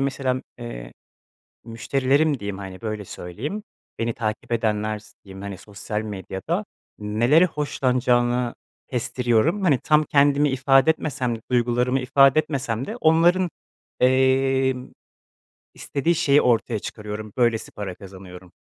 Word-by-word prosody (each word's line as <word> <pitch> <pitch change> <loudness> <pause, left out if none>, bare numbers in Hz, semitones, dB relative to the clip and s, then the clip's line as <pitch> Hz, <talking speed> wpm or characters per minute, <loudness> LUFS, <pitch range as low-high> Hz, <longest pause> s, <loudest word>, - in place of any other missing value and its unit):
mesela, 130 -2 -1 0.2
eee, 120 - -8 0.7
müşterilerim 135 +5 +1
diyeyim, 100 -1 -5
hani, 95 -2 -8
böyle 110 -2 -4
söyleyeyim, 125 - -6 0.4
beni 115 0 -1
takip 110 0 -4
edenler 110 -2 0
s 110 +1 -18
diyeyim, 95 0 -10
hani, 100 -2 -6
sosyal 105 +1 -5
medyada 105 - -4 0.3
nelere 115 +10 +3
hoşlanacağını 125 -5 0 0.3
kestiriyorum. 125 - 0
Hani, 145 -8 +3
tam 155 0 +3
kendimi 145 0 +3
ifade 135 +2 +4
etmesem 130 -7 -2
de - - -13
duygularımı 125 +1 +1
ifade 135 +2 +4
etmesem 135 -6 -2
de 220 - -5
onların, 175 0 +3 0.5
emm, 130 0 +2 0.9
istediği 160 +5 -1
şeyi 145 -2 +3
ortaya 115 -2 +1
çıkarıyorum, 105 0 -7
böylesi 120 -3 +1
para 100 -3 -6
kazanıyorum, 95 -2 -12
125 Hz, 120 wpm, -23 LUFS, 110-140 Hz, 0.9 s, ifade